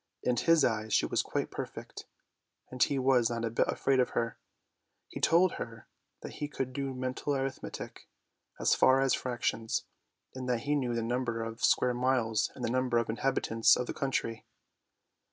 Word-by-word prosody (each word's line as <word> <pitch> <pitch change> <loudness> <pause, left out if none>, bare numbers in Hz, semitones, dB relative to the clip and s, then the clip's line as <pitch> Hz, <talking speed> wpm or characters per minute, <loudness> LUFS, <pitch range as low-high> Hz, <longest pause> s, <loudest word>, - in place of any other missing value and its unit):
In 125 - +2
his 165 +4 +4
eyes 110 -2 -1
she - - +3
was - - +1
quite - - -3
perfect, - - -7 0.6
and 125 -1 -7
he 140 - +3
was 130 -3 +3
not 115 -1 -2
a 115 - -2
bit 115 - +1
afraid 135 -1 +1
of 125 - +3
her; 115 -1 -1 0.7
he - - -7
told 175 +2 +3
her 115 -1 -7 0.4
that - - -7
he 150 - -4
could 135 -3 -4
do 135 -1 -3
mental 130 +3 -2
arithmetic, 135 0 -5 0.5
as - - +3
far 130 +1 +5
as 135 -1 +2
fractions, 120 -2 -1 0.5
and 130 -1 -5
that 120 -2 +1
he 145 +3 -1
knew 125 -5 0
the 115 - -1
number 120 -1 -1
of 115 0 -7
square 125 -1 +3
miles 120 -3 +1
and - - -4
the - - -1
number 130 -1 +1
of 115 -1 0
inhabitants 115 -2 +3
of 125 - -2
the - - -4
country. 115 -4 -2
125 Hz, 180 wpm, -30 LUFS, 115-135 Hz, 0.7 s, far